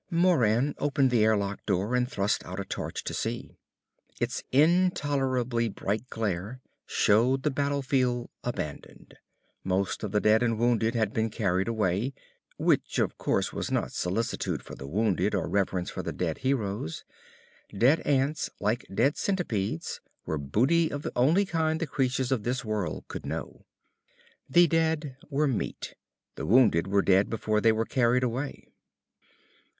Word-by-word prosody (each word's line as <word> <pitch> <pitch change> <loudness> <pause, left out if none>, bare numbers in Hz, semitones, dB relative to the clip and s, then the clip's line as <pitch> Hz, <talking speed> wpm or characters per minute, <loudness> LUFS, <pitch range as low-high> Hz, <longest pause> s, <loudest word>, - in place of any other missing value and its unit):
Moran 145 - +3
opened 140 -2 +2
the 115 -3 +4
airlock 100 -2 +1
door 100 +3 0
and 125 0 +1
thrust 100 -1 0
out 90 +2 -6
a 100 - -3
torch - - -5
to - - -4
see. - - -4 0.6
Its - - -2
intolerably 135 -7 +2
bright 105 +5 -3
glare 105 +2 -3 0.3
showed 125 +6 +3
the 150 - +1
battlefield 135 -3 0 0.2
abandoned. 75 -12 -6 0.5
Most 95 +1 -1
of 105 - -3
the 105 - +2
dead 110 +2 +4
and 115 -2 +1
wounded 115 0 +2
had 110 -3 0
been 110 0 0
carried 95 -3 0
away. 110 +3 0 0.4
Which, - - +1
of - - 0
course, - - 0
was - - -3
not - - -1
solicitude 90 - -2
for - - -10
the 70 - -8
wounded 100 +3 +1
or - - -1
reverence 95 -3 -1
for - - -4
the - - -4
dead 80 -3 -3
heroes. 105 -10 -2 0.7
Dead 125 +10 +4
ants, 145 +2 0
like 105 +3 -1
dead 135 +9 +2
centipedes, 110 - -2 0.2
were 80 - -2
booty 135 - +2
of 145 +1 -4
the - - -3
only 155 +11 +4
kind 160 -3 0
the - - -1
creatures 130 -2 -1
of 130 -5 +1
this 125 +3 -2
world 105 -7 -2
could - - -7
know. - - -6 0.8
The 175 +6 +6
dead 160 -4 0
were 150 +1 +1
meat. 130 -5 -3 0.4
The - - -4
wounded 105 -7 +4
were 100 0 +2
dead 95 +1 +3
before 110 -1 0
they 115 - +5
were 110 +1 0
carried 125 +1 +2
away. 125 +4 -3
120 Hz, 155 wpm, -28 LUFS, 100-135 Hz, 0.8 s, The